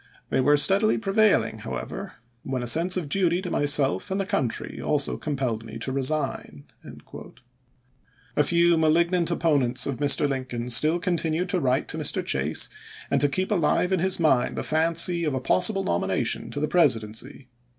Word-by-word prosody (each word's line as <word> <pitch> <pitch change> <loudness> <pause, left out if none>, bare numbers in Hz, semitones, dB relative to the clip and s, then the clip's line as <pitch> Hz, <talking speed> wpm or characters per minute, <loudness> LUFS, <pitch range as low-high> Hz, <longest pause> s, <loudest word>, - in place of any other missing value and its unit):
They 135 - +1
were 145 +3 +3
steadily 195 +8 +5
prevailing, 215 0 +1
however, - - -7 0.3
when 130 -2 -4
a - - -5
sense 170 +8 +3
of 170 -5 -3
duty 175 +2 0
to 180 - -5
myself 145 +3 +2
and 190 +1 -2
the 195 - -1
country 130 - -2
pp.1627!m628. - - -7
also 145 -2 +1
compelled 130 -7 -3
me 115 0 -9
to 125 +3 -5
resign." 135 - -3 1.7
A - - +3
few 170 +2 +2
malignant 170 +2 +1
opponents 145 -7 +1
of 140 -3 -3
Mr. 145 0 +3
Lincoln 130 -3 -4
still 155 +9 +4
continued 175 -1 -2
to 185 - 0
write 130 -3 0
to - - -3
Mr. - - -2
Chase 70 +3 -1 0.4
and 140 0 +2
keep 185 +5 -2
alive 180 0 +1
in 190 - +1
his 190 +2 0
mind 145 -7 +1
the - - -4
fancy 170 +2 +1
of 150 -4 -1
a - - -1
possible 185 +9 +1
nomination 85 - -2
to 145 - -5
the 150 - -1
Presidency. 125 -4 0
150 Hz, 170 wpm, -24 LUFS, 130-175 Hz, 1.7 s, steadily